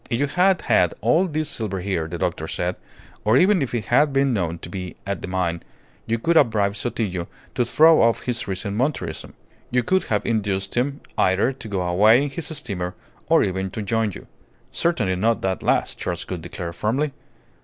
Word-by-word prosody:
"If 115 - 0
you 145 - +3
had 180 +5 +2
had - - +2
all 185 +4 +3
this 155 -2 -2
silver 110 -9 -2
here," 90 -4 -2
the 85 +2 -5
doctor - - -2
said, 90 +1 -2 0.5
"or 110 +4 +4
even 185 +2 +4
if 125 -3 -2
it 110 -4 -2
had 145 +4 +3
been 135 -1 +2
known 85 -5 -1
to - - -8
be 90 0 -6
at 100 -1 -3
the - - -5
mine, 90 -2 -1 0.5
you 115 +1 +1
could 165 +9 +1
have 140 -6 +6
bribed 100 -1 0
Sotillo 100 -6 -2 0.3
to 125 - +1
throw 160 +6 +5
off 115 0 +2
his 120 -3 -2
recent 100 +1 -3
Monterism. 120 - -2 0.3
You 125 0 +1
could 190 +10 +1
have 105 -2 -1
induced 100 -4 -1
him 135 +4 -1 0.2
either 95 +8 +3
to 125 - -9
go 100 -3 -2
away 105 +9 +5
in 145 - -2
his 155 +3 -4
steamer 90 -10 -4 0.3
or - - +5
even 95 0 -2
to 105 +3 -5
join 110 +1 0
you." - - -10 0.5
"Certainly 110 - 0
not 115 +4 +1
that 95 -1 -1
last," - - 0
Charles - - -3
Gould 90 -3 -5
declared, 85 0 -6
firmly. 130 - 0
110 Hz, 200 wpm, -23 LUFS, 95-135 Hz, 0.5 s, have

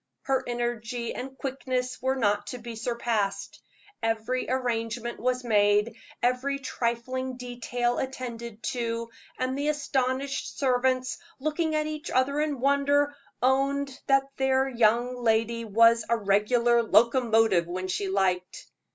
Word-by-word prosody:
Her 270 -1 +1
energy 240 -1 -3
and 265 +1 -7
quickness 255 -2 -3
were 260 +1 +1
not 205 -4 +1
to 250 - -5
be 235 -1 -8
surpassed. 225 -3 -2 0.4
Every 225 +3 -1
arrangement 240 -2 -2
was 255 +1 0
made, 210 0 +3 0.3
every 255 +3 +1
trifling 255 0 -3
detail 245 -1 -2
attended 235 -4 -5
to, 230 -1 -3 0.3
and 255 +1 -1
the 285 +2 -1
astonished 275 -2 -1
servants, 255 -1 +1 0.2
looking 310 +2 -1
at 305 0 +1
each 305 +1 -5
other 275 +3 +1
in 300 -3 -1
wonder, 285 +2 +2 0.3
owned 275 +1 +1
that 275 0 +5
their 265 0 +2
young 240 0 +2
lady 230 +1 +1
was 230 +2 +5
a 235 - +3
"regular 235 +4 +3
locomotive" 225 -4 +3
when 185 +2 -4
she 195 +1 -2
liked. 185 -2 0
245 Hz, 125 wpm, -27 LUFS, 230-265 Hz, 0.4 s, that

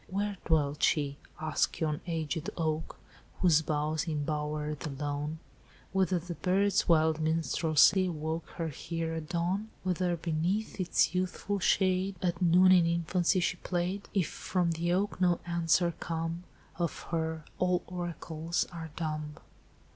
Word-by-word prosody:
"'Where 200 +2 -2
dwelt 150 -3 +1
she? 145 -2 +2 0.2
ask 155 -1 0
yon 155 -2 -1
aged 160 -1 -2
oak 160 -1 -1 0.4
Whose 165 -4 +5
boughs 155 +1 -1
embower 150 0 -2
the 150 +1 -5
lawn, 145 +2 -3 0.5
Whether 190 -1 +2
the 175 +1 -5
bird's 195 +3 +2
wild 160 -1 +4
minstrelsy 160 +3 +3
Awoke 160 0 -3
her 165 -1 -2
here 165 +2 -4
at 160 -1 -5
dawn? 185 +5 -1
Whether 180 -1 0
beneath 170 +7 -1
its 180 -1 +2
youthful 185 +2 -1
shade 185 +1 +2
At 175 -1 -1
noon, 180 +2 +6
in 175 -2 +6
infancy, 170 +2 +1
she 180 +1 0
played? 180 +3 -2
If 190 -6 +1
from 180 -2 -1
the 170 +1 -1
oak 190 +1 0
no 175 -2 +3
answer 170 0 +2
come 165 +1 -3 0.3
Of 170 -2 -2
her, 160 -2 -2
all 180 -1 +2
oracles 170 -2 -3
are 165 -1 -6
dumb! 155 -2 -3
170 Hz, 140 wpm, -30 LUFS, 155-180 Hz, 0.5 s, noon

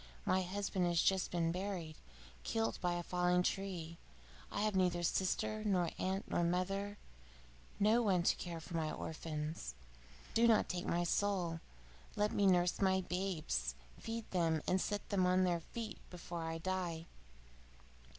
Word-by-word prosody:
My 190 - +3
husband 190 0 -1
has 170 -1 +2
just 190 +1 +3
been 165 -2 +1
buried, 180 -3 -3 0.5
killed 225 -1 -1
by 175 -1 +1
a 175 0 -2
falling 180 0 +2
tree. 180 -4 -2 0.5
I 205 - -1
have 210 -1 +1
neither 180 -2 +2
sister, 195 +4 0
nor 185 -5 +2
aunt, 190 +1 -1
nor 175 - +1
mother: 195 +4 0 0.8
no 215 +4 +5
one 190 -6 +3
to - - +4
care 170 -2 -5
for 170 +1 -7
my 160 -2 0
orphans. 155 - -4 0.6
Do 235 +1 +5
not 225 -2 +5
take 180 -1 -2
my 175 +1 +1
soul! 175 -2 0 0.6
Let 210 0 +2
me 200 - +3
nurse 180 0 +3
my 190 -1 +4
babes, 180 -3 -1 0.2
feed 225 -1 -4
them, 165 -4 +1
and 185 0 +3
set 205 0 -2
them 185 -2 +3
on 185 +1 +4
their 175 -2 +2
feet 225 +7 -6
before 175 -1 -5
I 165 0 -2
die. 175 -2 -2
180 Hz, 155 wpm, -36 LUFS, 170-195 Hz, 0.8 s, no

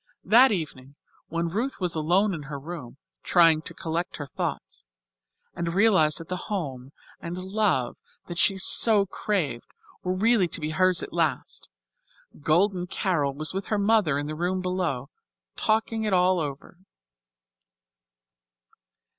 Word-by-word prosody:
That 240 +7 +6
evening 140 -7 -5 0.3
when 170 +1 -2
Ruth 230 +10 -3
was 180 -3 0
alone 180 +6 +2
in 160 - -5
her 145 - -5
room, 140 -4 -9 0.2
trying 165 -3 +4
to - - -5
collect 165 +2 -3
her 145 - -6
thoughts - - -6 0.7
and 170 0 -3
realize 190 -8 +4
that 165 - -8
the 180 0 -5
home 135 -10 -4 0.3
and 170 +1 -6
love 190 - -1 0.3
that 175 -1 -6
she 195 - +3
had 190 - -1
so 210 0 +6
craved 175 - -3 0.3
were 180 - -2
really 215 -1 +3
to - - -1
be 155 0 -3
hers 185 +2 +2
at - - -8
last, 160 -5 -2 0.7
Golden 180 +4 +1
Carol 155 -7 -1
was 155 +3 -3
with 195 0 -4
her 215 - 0
mother 200 -8 +2
in 145 - -3
the 150 - -5
room 175 +4 -1
below, 180 -8 -2 0.4
talking 220 +1 0
it 210 -2 -1
all 180 0 +3
over. 145 +3 -6
175 Hz, 145 wpm, -26 LUFS, 155-195 Hz, 0.7 s, That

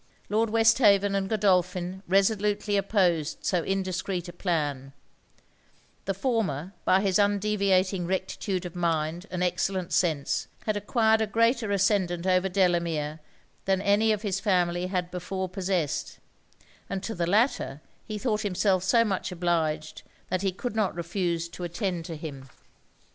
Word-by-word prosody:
Lord 220 +2 +1
Westhaven 210 -3 +4
and 195 -1 -1
Godolphin 185 -3 +1
resolutely 205 +2 +2
opposed 185 -6 +1
so 180 -2 +1
indiscreet 185 -1 -2
a 175 - -8
plan: 145 -7 -2 1.1
the 195 - -1
former, 195 - -1
by 190 +1 +4
his 195 0 +2
undeviating 200 -3 +2
rectitude 190 0 -2
of 175 0 -7
mind 170 +1 -1
and 180 0 -2
excellent 185 0 -1
sense, 155 -5 +1 0.2
had 215 - 0
acquired 220 +1 +2
a 220 - +1
greater 230 +1 +2
ascendant 195 -3 +1
over 185 0 +2
Delamere 170 -5 0 0.5
than 190 -1 +2
any 205 +3 +3
of 210 0 -1
his 195 -2 -1
family 180 -3 +1
had 180 -1 -2
before 185 +1 -3
possessed; 185 -4 -2 0.7
and 195 0 -3
to 225 - -3
the 170 -3 -1
latter 210 - +1 0.2
he 215 - -5
thought 215 -1 -1
himself 190 -2 +1
so 230 +5 +4
much 195 -4 -2
obliged, 160 -3 -1 0.3
that 185 - 0
he 195 -1 +1
could 220 +5 -5
not 215 -4 0
refuse 170 -1 -2
to 180 - -8
attend 175 -1 -3
to 165 - -6
him. 140 -4 -8
185 Hz, 145 wpm, -27 LUFS, 175-205 Hz, 1.1 s, Westhaven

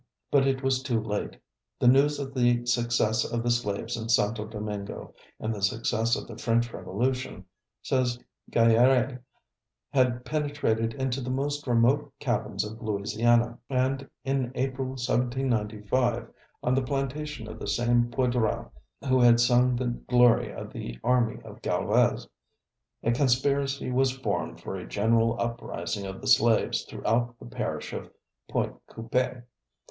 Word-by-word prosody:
But 135 -1 +4
it 135 0 0
was 130 -1 +1
too 125 -4 0
late. 105 -1 -3 0.4
The - - +2
news 140 +4 +5
of 135 -1 -5
the 120 -2 +2
success 120 -2 +1
of 115 -1 -2
the 120 - +1
slaves 105 -4 -1
in 115 -1 -5
Santo 110 -1 +2
Domingo, 105 -2 -6 0.3
and 110 +1 -2
the 105 - -6
success 110 +3 +1
of - - -6
the 115 -1 -9
French 120 0 +1
Revolution, 120 -1 -2 0.4
says 125 -2 +1 0.3
Gayarr├®, 125 +3 +4 0.7
had 125 -2 +2
penetrated 145 -6 -1
into 130 -1 -2
the 125 - -4
most 145 +2 -2
remote 120 +4 +3
cabins 110 -6 -1
of 110 +1 -8
Louisiana, 115 +3 +1
and 135 +1 0
in 135 -2 -1
April, 130 0 -1
1795, 120 -1 0 0.4
on 125 - +2
the 135 - +2
plantation 135 -1 -3
of 110 0 -8
the - - -6
same 120 +3 +2
Poydras 120 -2 0 0.4
who 130 0 +4
had 120 -1 +6
sung 125 +1 +4
the 125 +1 -2
glory 120 0 +3
of - - -8
the - - -6
army 125 -2 +2
of - - -12
Galvez, - - +1 0.8
a 115 - +2
conspiracy 135 +1 +1
was 130 +1 +3
formed 130 - -2
for 95 - -5
a 90 - -8
general 115 +2 +2
uprising 115 -3 -3
of 95 0 -7
the - - -6
slaves 115 -1 +3
throughout 120 +1 -1
the - - -12
parish - - -4
of - - -6 0.4
Pointe - - -1
Coup├®e. 120 +2 -2
120 Hz, 145 wpm, -27 LUFS, 115-130 Hz, 0.8 s, had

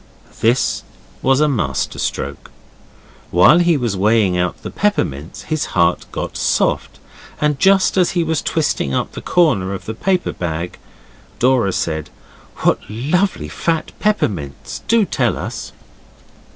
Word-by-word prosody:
This 120 +4 +2 0.4
was 135 +2 +3
a 150 - +4
master 75 - -1
stroke. - - -4 0.8
While 90 - +6
he 170 -2 +3
was 120 -6 -1
weighing 105 -1 +3
out 90 +5 -1
the - - -5
peppermints 80 - -1
his 155 -1 -1
heart 85 0 +2
got - - -4
soft, - - 0 0.4
and 150 -2 +1
just 195 0 +4
as 180 -2 +4
he 170 - +3
was 160 -2 0
twisting 145 - 0
up - - -1
the - - -8
corner 115 - +2
of 95 - -9
the 110 - -4
paper 185 - 0
bag, 85 0 -4 0.6
Dora 125 -5 +3
said, 80 -4 -2 0.5
'What - - +3
lovely 155 - 0
fat 165 -2 -2
peppermints! 95 - -2
Do 225 -2 +4
tell - - 0
us. - - -5
125 Hz, 140 wpm, -18 LUFS, -, 0.8 s, While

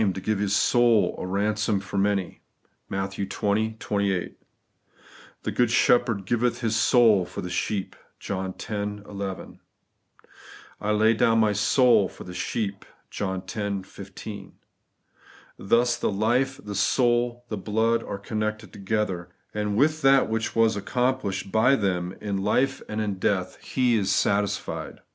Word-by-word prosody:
to - - -3
give 105 +1 -1
His 105 0 +1
soul 115 -3 +3
a - - -4
ransom 105 +2 0
for 95 +1 -9
many 100 -2 -1 0.2
' - - -42
(Matt. 95 0 -2
XX. 100 0 -4 0.5
28); 100 -5 -1 1.1
'The - - -2
good 120 -2 +2
Shepherd 120 -4 +3
giveth 120 +4 0
His 110 -2 0
soul 110 -4 +5
for 90 - -7
the 90 - -6
sheep' 95 +1 -2 0.2
(John 95 -1 -3
x. - - -8
11); 100 -2 -5 1.2
'I 105 - 0
lay 110 +2 +4
down 115 0 +3
my 110 -2 +3
soul 110 0 +4
for - - -11
the 90 - -9
sheep' 100 +1 -3 0.3
(John 95 -2 -3
x. 100 -3 -3
15). 100 0 -9 1.1
Thus 120 +5 +2
the - - 0
life, 120 +6 +1
the 105 - -6
soul, 120 +3 +1
the 105 - -3
blood, 110 +4 +1
are - - -5
connected 110 +1 -4
together; 95 -3 -2 0.2
and 105 -1 -1
with 155 +4 +2
that 135 -1 +5
which 110 0 -2
was 115 -1 +3
accomplished 105 -3 -1
by 125 +5 +4
them 90 -5 -1
in 100 -2 -3
life 125 +7 +1
and 110 +1 -2
in 100 -3 -3
death 95 -2 0
He 125 -3 +1
is 100 -2 0
satisfied. 100 +1 -1
105 Hz, 145 wpm, -25 LUFS, 100-115 Hz, 1.2 s, soul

